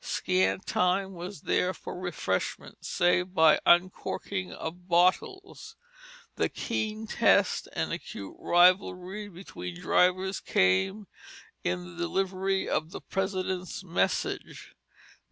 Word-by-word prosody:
Scant 95 +1 0
time 190 +2 +1
was 175 -1 -8
there 185 +1 0
for - - -8
refreshment, 175 - -3
save 180 +1 +1
by 160 -1 +6
uncorking 185 +1 +1
of 175 +2 -7
bottles. 185 - +1 0.6
The - - +1
keen 215 0 -3
test - - +2
and - - -2
acute 100 -1 -7
rivalry 185 +3 +2
between 90 - -8
drivers 185 - +2
came 95 - +1 0.6
in 90 0 -2
the 90 -1 -11
delivery 190 - -1
of 155 +1 -1
the - - -7
President's 185 -1 -3
Message. 175 -2 -2
180 Hz, 105 wpm, -28 LUFS, 160-190 Hz, 0.6 s, by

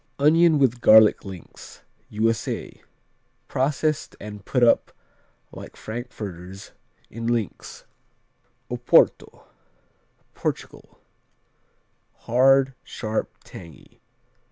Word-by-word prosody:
Onion 160 +3 +4
with 125 -3 +1
garlic 110 -2 +6
links 95 -4 -12 0.3
U.S.A 110 +1 -2 0.7
Processed 150 +3 -1
and 105 -1 -9
put 125 +4 0
up 120 - +3 0.6
like - - -11
frankfurters, 100 -5 -8 0.4
in 115 +1 -6
links. 115 -4 -4 0.9
Oporto - - +2 0.9
Portugal - - -6 1.2
Hard; 135 +2 +3
sharp; 110 -1 -4
tangy. 85 -6 -14
115 Hz, 75 wpm, -23 LUFS, 105-135 Hz, 1.2 s, garlic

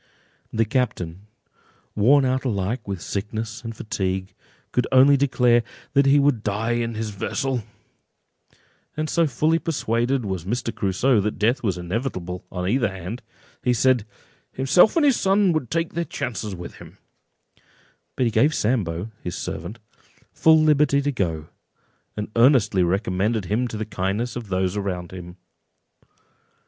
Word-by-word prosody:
The 115 0 +1
captain, 105 -6 -2 0.7
worn 130 +7 +5
out 130 0 0
alike 110 -1 -2
with 95 -3 -4
sickness 110 +3 -4
and 115 -1 -6
fatigue, 95 -2 -3 0.4
could 125 - 0
only 135 +2 +7
declare—"That 130 +1 +1
he 140 +1 +6
would 140 -5 +3
die 105 +2 -1
in 115 -1 -1
his 110 -1 -3
vessel;" 125 +5 -2 1.3
and 155 0 -1
so 165 0 +2
fully 155 +5 +1
persuaded 125 -5 -1
was 95 -4 -3
Mr. 115 +4 -2
Crusoe 105 +4 +2
that 105 +1 -2
death 120 +6 +1
was 95 -6 -1
inevitable 90 -1 -4
on 90 -1 -3
either 120 +4 +2
hand, 95 +5 -7 0.4
that - - -2
he - - +5
said—"Himself 130 - +1
and 295 -4 +5
son 195 -3 +2
would 155 -6 -2
take 165 0 -1
their 170 - -1
chance 135 -8 -4
with 90 -2 -8
him;" - - -14 1.2
but 130 - +1
he 115 - +1
gave 140 +8 +3
Sambo, 105 -4 -1
his 90 - -4
servant, 110 - -5 0.6
full 160 0 +5
liberty 150 -2 +3
to 145 - 0
go; 80 - -2 0.7
and 105 0 -4
earnestly 115 -5 +4
recommended 95 +3 0
him 110 +7 0
to 110 - -6
the 110 - -3
kindness 105 +4 -2
of 120 -3 -6
those 95 0 -1
around 95 -4 -3
him. 90 -1 -9
115 Hz, 145 wpm, -23 LUFS, 95-135 Hz, 1.3 s, only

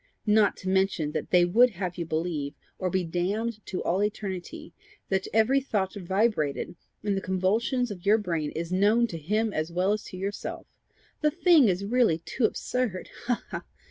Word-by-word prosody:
not 210 -1 +4
to 185 - -8
mention 190 -5 +1
that 155 - -3
they 180 -1 +5
would 235 +8 +5
have 185 -4 -4
you 170 -2 -4
believe, 155 -3 -2 0.2
or 185 - 0
be 185 0 0
damned 205 +7 -2
to 185 - -3
all 185 +4 +1
eternity, 200 -3 -4 0.4
that 190 -1 0
every 230 +6 +3
thought 200 -8 -1
vibrated 190 -5 0 0.3
in 205 -1 +1
the 195 - -1
convolutions 215 +7 0
of 180 -4 -8
your 210 +2 +5
brain 165 -8 -2
is 165 +1 -4
known 210 +5 +4
to 170 -8 -5
him 210 +7 0
as 155 +2 -2
well 185 +4 +2
as 210 - -3
to 185 - -9
yourself! 200 +2 -4 0.6
The 305 - +4
thing 330 -4 +5
is 190 +1 0
really 230 -6 +3
too 195 +8 -1
absurd! 230 -4 -2 0.2
Ha! 245 - +3
ha! - - -16 0.2
ha! - - -21
195 Hz, 185 wpm, -27 LUFS, 175-220 Hz, 0.6 s, they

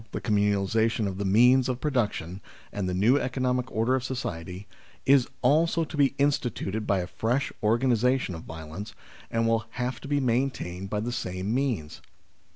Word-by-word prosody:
the - - -2
communalisation 105 +1 +1
of 95 0 -5
the 100 - -1
means 125 +6 +5
of 125 -1 -2
production, 105 - -1 0.3
and 95 -3 -2
the - - -2
new 115 +9 +4
economic 125 -1 -1
order 115 +4 +1
of 130 -2 0
society, 95 -8 -5 0.4
is 135 -2 +5 0.2
also 165 +5 +3
to 155 - -7
be 140 -2 +3
instituted 120 -7 -1
by 100 - +2
a - - -3
fresh 120 +9 -1
organisation 120 0 +2
of 80 - -7
violence, 80 +8 -8 0.3
and 115 0 +1
will 115 -1 +1
have 125 +1 -4
to - - -8
be 145 0 +1
maintained 115 -8 -1
by 105 - -1
the 115 +3 -3
same 95 -1 -3
means. 120 - -2
115 Hz, 165 wpm, -27 LUFS, 100-130 Hz, 0.4 s, means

